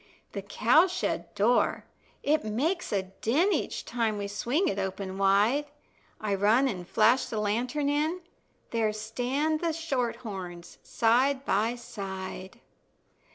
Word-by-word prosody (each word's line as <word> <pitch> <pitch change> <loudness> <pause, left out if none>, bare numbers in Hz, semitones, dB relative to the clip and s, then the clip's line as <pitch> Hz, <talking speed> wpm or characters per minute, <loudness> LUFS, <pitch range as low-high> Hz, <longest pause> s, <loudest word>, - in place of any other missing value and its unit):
The 200 - -4
cow 240 - +4
shed 365 0 -2
door, 230 +4 +2 0.4
it 305 +2 +2
makes 290 - -1
a 200 -3 +1
din 240 - +1
Each - - -2
time 225 -3 -1
we 200 0 -3
swing 245 - 0
it 200 - -1
open 190 0 -4
wide; 205 +9 +3 0.5
I 210 -2 -1
run 215 +7 +4
an' 185 -8 -4
flash 225 +8 +3
the 220 - -4
lantern 245 +8 0
in, 305 +5 0 0.5
There 220 -2 +1
stand 250 +8 -1
the 335 -1 0
shorthorns 235 - -4
side 260 +4 +2
by 220 +3 +1
side. 195 -2 -7
230 Hz, 130 wpm, -28 LUFS, 200-280 Hz, 0.5 s, cow